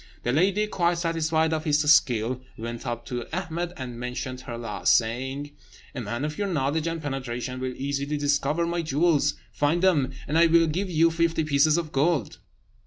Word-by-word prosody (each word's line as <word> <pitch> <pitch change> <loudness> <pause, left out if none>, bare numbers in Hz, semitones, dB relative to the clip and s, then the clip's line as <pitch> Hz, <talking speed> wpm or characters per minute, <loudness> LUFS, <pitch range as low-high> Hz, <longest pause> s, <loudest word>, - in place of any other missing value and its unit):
The 120 - 0
lady, 190 +9 +2
quite 175 -4 0
satisfied 160 -1 +1
of 155 -1 -1
his 150 -2 +2
skill, 125 -3 +2 0.2
went 115 +3 -6
up 120 0 -4
to 120 -1 -5
Ahmed 175 0 -3
and 125 -3 -6
mentioned 125 +1 -5
her 120 -2 -7
loss, 115 -3 -2
saying: 130 +5 0 0.4
"A 130 - -4
man 120 +5 -3
of 150 0 -5
your 205 - 0
knowledge 155 -1 0
and 165 0 -2
penetration 130 -3 -4
will 130 -1 -3
easily 140 +2 -2
discover 145 +3 +1
my 170 0 -1
jewels; 150 -1 +2 0.2
find 160 +5 +1
them, 150 -8 +3 0.2
and 155 +4 +2
I 170 - +6
will 165 0 +5
give 180 +5 -2
you 165 -1 +3
fifty 165 -1 +1
pieces 155 +1 +3
of 165 -3 -3
gold." 145 -3 0
150 Hz, 180 wpm, -26 LUFS, 130-165 Hz, 0.4 s, I